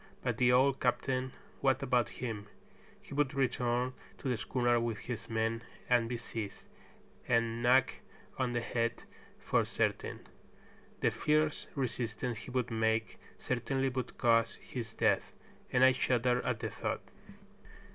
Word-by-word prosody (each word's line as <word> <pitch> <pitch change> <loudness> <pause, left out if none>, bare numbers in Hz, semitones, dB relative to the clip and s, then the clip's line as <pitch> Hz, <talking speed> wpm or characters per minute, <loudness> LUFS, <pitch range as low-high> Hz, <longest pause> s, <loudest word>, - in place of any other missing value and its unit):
But - - -1
the 125 -1 +5
old 130 +2 +4
captain, 130 +1 0 0.3
what 135 0 +2
about 125 -2 +2
him? 110 -5 -4 0.6
He - - -10
would 145 -1 +1
return 125 -1 +1 0.2
to - - -6
the 125 - +2
schooner 120 +2 +1
with 115 -2 -1
his 115 +3 -6
men 115 0 0 0.3
and 120 -2 +3
be 120 - -2
seized, 110 -3 -6 0.6
and 115 -1 +2
knocked 125 +2 +4 0.4
on 130 -2 0
the 120 - 0
head 115 0 -1 0.3
for - - +1
certain. - - -1 0.8
The - - +3
fierce 155 0 +1
resistance 120 -3 -2
he 115 - -9
would 125 -2 -1
make 110 0 0 0.2
certainly 130 +2 0
would 130 -1 -4
cause 115 -1 +3
his 115 -3 -6
death, - - +1 0.4
and 125 - +4
I 130 - +8
shuddered 125 -1 +2
at 125 -4 -1
the - - -2
thought. - - -3
120 Hz, 145 wpm, -33 LUFS, 115-130 Hz, 0.8 s, I